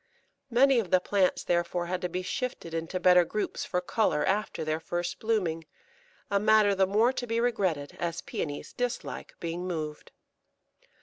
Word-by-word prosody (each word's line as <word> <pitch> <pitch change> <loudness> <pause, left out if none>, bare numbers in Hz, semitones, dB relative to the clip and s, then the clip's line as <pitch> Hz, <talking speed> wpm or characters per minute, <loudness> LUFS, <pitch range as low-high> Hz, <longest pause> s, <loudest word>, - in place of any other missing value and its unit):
Many 260 +1 +5
of 200 -6 -3
the 185 - +5
plants 190 0 +1
therefore 175 0 0
had 180 +1 -3
to 180 - -2
be 185 +1 -3
shifted 215 -5 -4
into 165 +3 -3
better 180 0 +6
groups 210 +5 -3
for 180 - -1
colour 180 -4 +1
after 205 -4 -1
their 155 0 -1
first 175 +1 -3
blooming, 180 -8 0 0.7
a 200 - +3
matter 215 -1 +5
the 190 -1 +3
more 220 +6 +3
to 245 - -4
be 230 0 0
regretted 185 -12 0
as 170 0 -3
Pæonies 145 -2 -5
dislike 245 -1 -4
being 170 +2 -4
moved. 155 -4 -5
185 Hz, 165 wpm, -28 LUFS, 170-215 Hz, 0.7 s, better